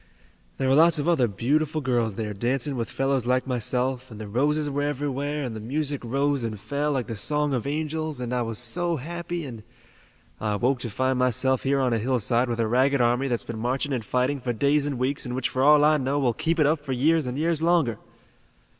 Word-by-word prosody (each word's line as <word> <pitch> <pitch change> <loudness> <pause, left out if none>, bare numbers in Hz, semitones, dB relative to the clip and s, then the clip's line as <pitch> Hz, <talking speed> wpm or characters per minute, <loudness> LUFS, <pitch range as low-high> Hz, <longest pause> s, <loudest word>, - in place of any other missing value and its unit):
There 135 - 0
were 130 - +4
lots 165 +3 +5
of 145 - -2
other 155 -8 +3
beautiful 145 +9 0
girls 120 -6 0
there 105 -1 -3
dancing 130 +6 -1
with 115 -3 -3
fellows 135 -2 -1
like 130 0 +2
myself, 125 +1 -1
and 110 -2 -10
the 110 - -6
roses 145 +7 +1
were 145 0 -2
everywhere, 145 0 -2
and 120 -4 -4
the - - -5
music 140 +5 -2
rose 140 +2 0
and 110 -3 -4
fell 145 +7 -2
like 130 -4 -1
the 115 - -5
song 150 +7 +1
of 125 0 -2
angels, 155 0 -2
and 125 0 -3
I 125 - 0
was 115 -2 -3
so 170 +9 +1
happy 170 +3 -5
and 115 -5 -8 0.8
I 105 -1 -1
awoke 125 +5 +1
to 120 - -4
find 130 +4 0
myself 130 +1 +2
here 140 0 +1
on 130 -3 +1
a 115 - +1
hillside 120 +1 +1
with 120 -1 -2
a 115 - +1
ragged 130 +4 +2
army 120 +3 +2
that's 120 -3 -1
been 115 -2 -6
marching 130 +4 -1
and 120 -4 -2
fighting 125 +6 0
for 125 -1 -2
days 140 +5 +2
and 140 -3 -3
weeks, 130 +3 -1
and 125 -1 -4
which, 130 -1 -1
for 130 - -2
all 150 +1 +6
I 155 0 +4
know, 135 +1 -1
will 130 -4 +1
keep 165 +8 -1
it 150 - +5
up 150 0 +1
for 135 -3 -3
years 150 +3 +2
and 125 +1 -4
years 160 0 0
longer." 165 - +2
130 Hz, 230 wpm, -25 LUFS, 120-145 Hz, 0.8 s, all